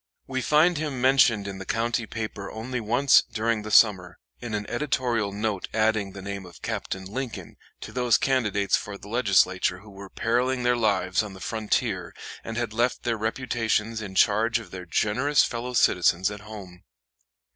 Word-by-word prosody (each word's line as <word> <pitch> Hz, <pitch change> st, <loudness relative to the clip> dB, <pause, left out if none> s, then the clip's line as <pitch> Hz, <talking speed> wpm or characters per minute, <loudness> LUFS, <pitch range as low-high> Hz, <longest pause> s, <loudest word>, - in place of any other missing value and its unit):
We 130 Hz, -1 st, -3 dB
find 155 Hz, +5 st, +3 dB
him 150 Hz, -4 st, -3 dB
mentioned 125 Hz, -5 st, +4 dB
in 95 Hz, -1 st, -6 dB
the -, -, -5 dB
county 115 Hz, +2 st, -1 dB
paper 110 Hz, -3 st, -5 dB
only 120 Hz, +3 st, -5 dB
once 120 Hz, +5 st, +4 dB
during 115 Hz, 0 st, -2 dB
the 105 Hz, -, -7 dB
summer, 95 Hz, -4 st, +4 dB, 0.2 s
in 115 Hz, -3 st, -4 dB
an 105 Hz, -1 st, -4 dB
editorial 120 Hz, -6 st, -1 dB
note 105 Hz, -1 st, -2 dB
adding 110 Hz, -3 st, +1 dB
the 100 Hz, -, -9 dB
name 100 Hz, 0 st, -5 dB
of 90 Hz, -3 st, -14 dB
Captain 95 Hz, 0 st, -4 dB
Lincoln 120 Hz, +5 st, -6 dB, 0.3 s
to -, -, -8 dB
those 125 Hz, -2 st, +2 dB
candidates 105 Hz, -7 st, +1 dB
for 100 Hz, -1 st, -5 dB
the 100 Hz, -, -13 dB
Legislature 95 Hz, -5 st, +2 dB
who 105 Hz, -1 st, -14 dB
were 100 Hz, 0 st, -11 dB
periling 125 Hz, +4 st, 0 dB
their 120 Hz, 0 st, +3 dB
lives 100 Hz, -5 st, +1 dB
on 105 Hz, -2 st, -7 dB
the 95 Hz, -, -11 dB
frontier 105 Hz, -4 st, -2 dB, 0.3 s
and 115 Hz, 0 st, -6 dB
had 120 Hz, -3 st, -2 dB
left 120 Hz, +2 st, 0 dB
their 120 Hz, -2 st, 0 dB
reputations 115 Hz, -1 st, -1 dB
in 100 Hz, -3 st, -7 dB
charge 110 Hz, +5 st, +3 dB
of 110 Hz, -6 st, -10 dB
their 90 Hz, -1 st, -8 dB
generous 125 Hz, -, +2 dB
fellow 120 Hz, +1 st, -4 dB
citizens 90 Hz, -2 st, +3 dB
at 105 Hz, -, -7 dB
home. 100 Hz, -4 st, -11 dB
110 Hz, 175 wpm, -25 LUFS, 100-120 Hz, 0.3 s, mentioned